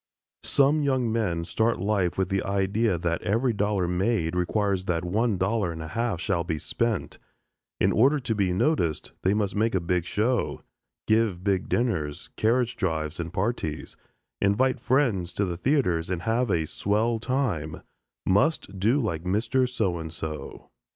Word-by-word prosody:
Some 140 +2 +3
young 130 -5 +1
men 100 -7 0
start 110 +6 0
life 95 -2 0
with 95 -1 0
the 95 -1 +1
idea 100 +1 +1
that 85 0 -1
every 115 +5 +1
dollar 100 -3 0
made 90 -1 0
requires 95 +1 0
that 85 -2 -1
one 105 +3 +1
dollar 95 -1 0
and 80 - -7
a 80 - -7
half 115 0 -1
shall 85 -1 0
be 80 -2 -2
spent; 115 +6 -2 0.6
in - - +3
order 135 +7 +4
to 120 - -1
be 100 -4 +1
noticed 90 - 0
they 95 +2 +2
must 105 -1 -1
make 110 0 +1
a - - +3
big 85 0 0
show, 115 +7 0 0.4
give 110 -5 +2
big 100 -2 0
dinners, 85 -12 -1
carriage 120 +2 +1
drives, 80 -4 -2
and 85 -1 -4
parties, 95 -7 -2 0.5
invite 105 +7 +2
friends 115 -10 +1
to 100 - 0
the 90 -2 -3
theaters, 90 - +1
and 90 -2 -2
have 115 +2 +1
a 80 -4 +1
"swell" 110 +7 0
time; 105 - -2 0.4
must 100 - +1
do 115 +9 +3
like 85 - -1
Mr. 115 +7 +1
"So 100 -8 -1
and 80 -1 -6
So." 80 -1 -7
100 Hz, 165 wpm, -26 LUFS, 90-115 Hz, 0.6 s, order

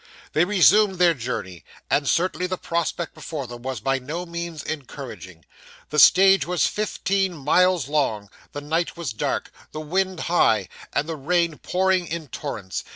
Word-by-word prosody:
They 160 +3 +3
resumed 205 +1 +5
their 175 -1 +5
journey; 110 - -5 0.2
and 140 -1 +1
certainly 180 0 +1
the 185 0 -3
prospect 170 0 -2
before 150 -5 -6
them 120 0 -9
was 130 -2 -4
by 135 +3 0
no 155 +8 -5
means 170 -2 -6
encouraging. 115 - -8 0.5
The 150 - +2
stage 190 +5 +7
was 180 -1 +1
fifteen 195 -3 -1
miles 180 +3 +2
long, 115 -9 -1 0.2
the 145 - -6
night 165 +4 -2
was 160 -9 -4
dark, 110 - -2 0.2
the 155 - -6
wind 185 +3 -1
high, 110 - +2 0.2
and 150 - -1
the 165 - -3
rain 170 +2 0
pouring 185 -1 +1
in 160 -3 -5
torrents. 110 -10 -5
160 Hz, 155 wpm, -23 LUFS, 135-180 Hz, 0.5 s, stage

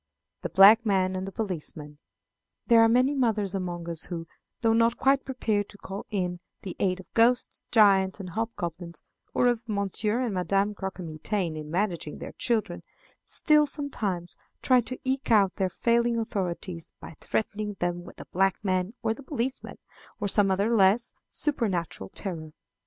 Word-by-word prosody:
The - - -3
Black 200 +6 +8
Man 190 -3 +1
and 185 +1 -3
the - - -5
Policeman. 155 -7 -5 0.7
There 230 -2 +6
are 225 - +6
many 255 +4 +3
mothers 220 -8 0
among 175 -3 -4
us 165 -2 -4
who 170 -2 -5 0.4
though 225 -1 +3
not 230 +1 +3
quite 270 0 +2
prepared 220 -6 -1
to 205 - -13
call 195 0 -7
in 180 -4 -2 0.2
the 190 - -6
aid 185 -1 +1
of 185 - -14
ghosts, 240 +2 +2
giants, 195 -3 +4
and 185 -2 -7
hobgoblins, 175 -5 -5 0.3
or - - +3
of 240 -2 +2
Monsieur 210 +3 -1
and 240 -5 -1
Madame 195 +3 +1
Croquemitaine, 185 -2 -3
in 155 -1 -7
managing 175 -3 -2
their - - -7
children 230 -3 -1 0.4
still, 300 -1 +4
sometimes, 200 - -3 0.3
try 255 -2 +5
to 255 +2 -6
eke 265 +1 -2
out 200 -4 +4
their 190 -2 +1
failing 235 +4 +1
authority 185 -5 -3 0.2
by - - -10
threatening 210 -1 -2
them 175 0 -1
with - - -12
the - - -10
"black 195 +1 +2
man," 185 +2 -1
or 220 -1 +1
the 255 - -12
"policeman," 260 -2 -4 0.4
or 205 - -1
some 200 0 +3
other 200 +5 +1
less, 205 +4 +3 0.2
supernatural 185 - -1
terror. 160 -5 -5
200 Hz, 165 wpm, -27 LUFS, 180-230 Hz, 0.7 s, Black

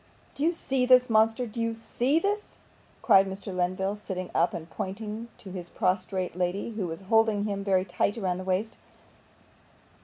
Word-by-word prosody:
'Do - - -8
you 330 - +4
see 270 -6 -1
this, 250 -1 +5
monster? 225 +3 +3
Do 230 +1 -5
you 230 0 -1
see 245 +5 0
THIS?' 410 +4 -1 0.5
cried 195 0 +6
Mr. 195 0 -6
Lenville, 185 +2 0
sitting 185 -3 -5
up, 170 +1 +3
and 165 -1 -6
pointing 210 +5 -5
to 190 - -10
his 180 -2 -6
prostrate 185 -1 -1
lady, 180 +5 -1
who 210 -5 -3
was 165 +1 -6
holding 220 +1 +3
him 200 -1 -2
very 190 -2 +2
tight 205 +2 0
round 185 -4 -1
the - - -5
waist. 190 +4 -1
200 Hz, 175 wpm, -28 LUFS, 185-225 Hz, 0.5 s, cried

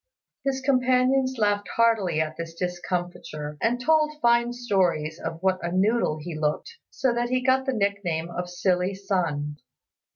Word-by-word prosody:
His 270 -1 -1
companions 260 0 +2
laughed 205 -2 +1
heartily 225 -8 +3
at 155 0 -3
his 165 0 -6
discomfiture, 175 -4 -4
and 240 +2 +1
told 305 +2 +2
fine 235 -2 +3
stories 180 -10 0
of 165 - -4
what 190 -1 +2
a 170 - -3
noodle 195 -2 +2
he 165 +3 -6
looked, 155 - -2
so 260 -3 0
that 240 0 -1
he 255 0 +2
got 260 +1 +2
the 265 - +1
nickname 200 -6 -1
of 180 +1 -4
Silly 180 +1 0
Sun. 170 -7 -2
200 Hz, 155 wpm, -25 LUFS, 170-250 Hz, -, heartily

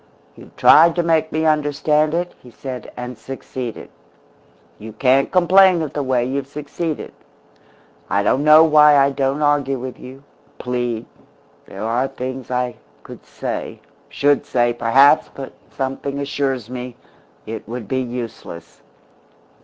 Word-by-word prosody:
"You've - - -16
tried 165 +1 +6
to 175 - 0
make 160 -1 +1
me 160 +1 -1
understand 150 0 +1
it," 175 +1 -2
he 125 - -15
said, 125 0 -8
"and 125 0 -6
succeeded. 130 -3 -7 0.9
You 110 +1 -9
can't 130 +4 +2
complain 185 -1 +5
of 150 - -6
the 145 - -2
way 130 -3 0
you've 135 +1 -3
succeeded. 150 +2 -5 1.0
I 100 0 +1
don't 135 - +1
know 155 +1 +7
why 150 -2 +6
I 140 0 +4
don't 140 +2 -1
argue 145 -2 +1
with 130 0 -7
you 130 +2 -12 0.3
plead; 120 -2 -3 0.6
there 100 +2 -8
are 120 +4 0
things 130 0 -7
I 125 -1 -2 0.3
could - - -12
say - - -5 0.3
should 145 -1 +1
say, 120 -1 +1
perhaps 130 +6 +4
but 135 -1 -9 0.2
something 135 +1 -4
assures 140 -4 -2
me 125 0 -7 0.5
it 110 -1 -7
would 120 -3 -6
be 130 +3 -1
useless. 120 -8 -8
135 Hz, 140 wpm, -19 LUFS, 125-150 Hz, 1.0 s, know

